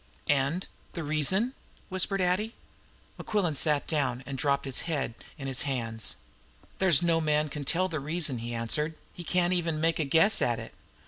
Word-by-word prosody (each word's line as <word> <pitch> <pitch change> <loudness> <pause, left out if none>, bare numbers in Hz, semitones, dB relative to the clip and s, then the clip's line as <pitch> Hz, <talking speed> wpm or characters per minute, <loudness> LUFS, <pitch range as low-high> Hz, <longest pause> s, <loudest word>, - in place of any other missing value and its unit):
"And 140 +7 -1 0.3
the 170 - -4
reason?" 155 - +1 0.4
whispered 190 +1 +1
Addie. 185 +5 +1 0.6
Mequillen 200 -7 0
sat 150 0 +2
down, 135 -5 -1
and 140 - -5
dropped 140 +1 +1
his 135 -2 -1
head 140 -7 -1 0.2
in 135 - -7
his 135 -1 -2
hands. 115 -5 -2 0.6
"There's 175 -4 +5
no 165 -1 +3
man 150 -1 +1
can 145 0 -6
tell 180 +6 +1
the 160 -4 -3
reason," 150 -3 0
he 120 +1 -5
answered. 135 +7 0 0.2
"He 175 - -8
can't 180 +1 +2
even 165 -3 0
make 165 +1 +1
a - - +2
guess 165 +9 +5
at 120 -1 +2
it. 115 - -9
155 Hz, 175 wpm, -29 LUFS, 135-175 Hz, 0.6 s, There's